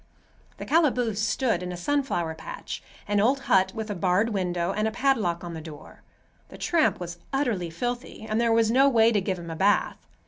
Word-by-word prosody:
The - - -7
calaboose 250 -9 +2
stood 230 -3 0
in 180 0 -4
a 180 - -5
sunflower 175 - -1
patch,—an 200 +5 -5
old 255 +6 +2
hut 190 -5 +3
with 220 -1 -4
a - - -3
barred 185 +5 +2
window 180 -4 -1
and 215 +1 0
a - - -1
padlock 225 -10 0
on 170 -1 -6
the 160 - -6
door. 155 -2 -12 0.5
The - - -11
tramp 330 -3 +1
was 175 -1 -7
utterly 235 -11 -1
filthy 240 +5 -5
and 215 +2 0
there 235 -1 +2
was 225 -1 +3
no 270 +3 +5
way 230 -3 +4
to 210 -3 +2
give 190 -1 -2
him 170 -1 -7
a - - -5
bath. 200 +5 +1
210 Hz, 200 wpm, -26 LUFS, 175-245 Hz, 0.5 s, no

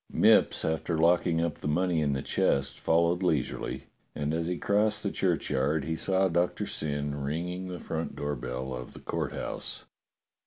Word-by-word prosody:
Mipps, - - +4
after 80 +1 -1
locking 85 0 +3
up 85 -2 -2
the - - -4
money 85 +2 +1
in 70 -2 +1
the 65 - -2
chest, 70 0 +1
fol 85 +1 +3
lowed 90 +2 -1
leisurely, 80 -8 -1 0.3
and 75 +1 -1
as 85 0 -1
he 90 0 -1
crossed 105 +2 +1
the 100 - -1
churchyard 75 -5 0
he 80 - -1
saw 95 +3 +2
Doctor 85 0 0
Syn 75 -1 -2
ringing 90 +6 -3
the 90 -1 -5
front 80 -1 -4
door 75 0 -2
bell 65 0 -4
of 60 0 -7
the - - -10
Court - - -3
House. - - -4
80 Hz, 180 wpm, -29 LUFS, 75-90 Hz, 0.3 s, Mipps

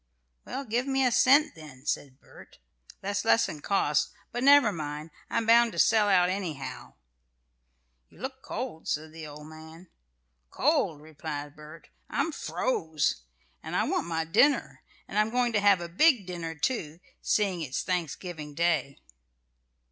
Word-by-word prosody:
"Well, 275 - -5
give 240 +3 -1
me 270 -1 +2
a 250 - +3
cent 285 +6 +5
then," 150 -4 -13
said 140 -2 -3
Bert. - - -16 0.4
"That's 200 +1 -2
less'n 225 -9 +2
cost; 150 -6 +1 0.2
but 240 +1 -3
never 280 -5 +7
mind; 155 -2 -6 0.2
I'm 230 - 0
bound 235 0 +5
to - - -8
sell 215 -2 +4
out 180 -2 +5
anyhow." 180 - -5 1.1
"You - - -21
look 265 +1 -6
cold," 245 -14 -6
said 155 +1 -3
the 160 -1 -8
old 150 0 -10
man. 160 +3 -13 0.6
"Cold?" 150 - +1
replied 150 -1 -7
Bert; 150 +2 -13 0.2
"I'm 330 - -1
froze. 160 - -1 0.4
And - - -6
I - - +2
want - - -1
my 165 -1 -1
dinner. 240 - +2 0.3
And 205 - -1
I'm 215 +1 +2
going 245 0 +1
to 210 - +3
have 200 -3 +4
a 170 - -4
big 235 - +3
dinner, 170 -2 -5
too, 160 - -2 0.2
seeing 195 -5 +1
it's 135 -4 -3
Thanksgiving 170 -3 -4
Day." 155 -5 0
170 Hz, 150 wpm, -28 LUFS, 155-225 Hz, 1.1 s, never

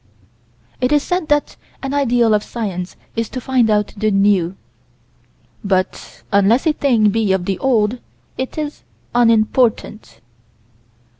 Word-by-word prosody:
It 250 +2 +1
is 295 -1 +3
said 360 -3 -2
that 295 0 0 0.3
an 270 0 -3
ideal 245 -5 +2
of 210 - +2
science 190 -6 -5 0.2
is 230 -2 -2
to 255 - -5
find 250 -2 +1
out 210 -1 +1
the 215 +1 0
new 195 -3 +2 1.1
but, 190 -2 -2
unless 200 - +3
a 315 - +3
thing 235 -8 +2
be 215 -2 0
of 190 -2 0
the 190 -1 -2
old, 240 -2 +1 0.4
it 260 +3 -5
is 300 -1 -4 0.3
"unimportant." 225 - +1
225 Hz, 135 wpm, -18 LUFS, 200-260 Hz, 1.1 s, is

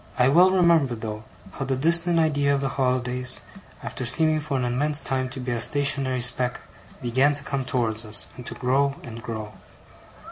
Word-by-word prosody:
I 125 +1 +4
well 175 +6 +6
remember 170 -8 +3
though, 110 -1 -7 0.3
how 135 - -5
the 135 0 -1
distant 170 +5 +2
idea 145 -3 +2
of 140 - -2
the 135 - -1
holidays, 125 -1 -1 0.4
after 130 - -5
seeming 155 +5 +3
for 145 -2 -2
an 125 - -1
immense 145 +5 +2
time 130 -4 -2
to 135 +1 -8
be 125 -1 -4
a 120 -1 -2
stationary 135 0 +1
speck, 125 0 +1 0.4
began 130 +4 +2
to 145 - -7
come 140 -1 -3
towards 115 -3 -1
us, 105 -4 0
and 125 - -9
to - - -6
grow 135 +2 +1
and 115 -1 -9
grow. 110 -2 -6
130 Hz, 185 wpm, -24 LUFS, 125-145 Hz, 0.4 s, well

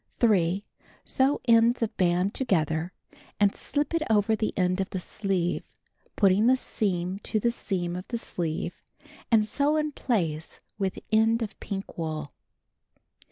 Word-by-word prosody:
3. 195 -4 +2 0.4
Sew 270 +2 +2
ends 230 +1 +5
of 220 - -2
band 180 +1 +2
together, 165 - 0 0.5
and 205 -1 +3
slip 290 +3 -2
it 330 - +1
over 220 0 +3
the 215 0 -1
end 185 0 +2
of 190 - -3
the 185 - -3
sleeve, 180 -2 -1 0.5
putting 200 +2 +4
the 260 +1 +5
seam 185 -5 -2
to 215 - -1
the 235 +3 +2
seam 175 -6 -3
of 180 +1 -6
the 235 - -2
sleeve, 165 -7 -3 0.5
and 220 -2 +4
sew 285 +7 +1
in 305 0 0
place 165 - -2 0.2
with 195 -2 -1
end 225 +1 +3
of 215 - -7
pink 195 -3 -6
wool. 155 -3 -4
200 Hz, 150 wpm, -27 LUFS, 180-230 Hz, 0.5 s, ends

